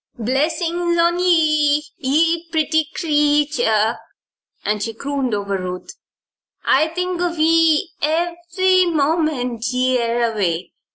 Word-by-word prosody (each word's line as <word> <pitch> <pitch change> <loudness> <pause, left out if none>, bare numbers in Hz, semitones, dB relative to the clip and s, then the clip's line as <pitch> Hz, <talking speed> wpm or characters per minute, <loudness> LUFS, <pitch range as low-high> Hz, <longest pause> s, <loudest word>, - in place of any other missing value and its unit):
"Blessin's 325 - -1
on 340 +1 +2
ye, 305 -4 +3 0.2
ye 330 +4 +1
pretty 315 -1 0
creetur," 290 -8 +1 0.8
she 225 +2 -4
crooned 275 -3 -2
over 200 -1 -3
Ruth. 180 0 -6 0.7
"I'll 310 +4 +3
think 360 -1 -2
of 345 -1 -1
ye 325 0 +3
ev'ry 345 +4 +1
moment 295 -7 -1
ye 255 0 +1
air 235 0 0
away. 180 -4 -2
305 Hz, 105 wpm, -19 LUFS, 250-335 Hz, 0.8 s, ye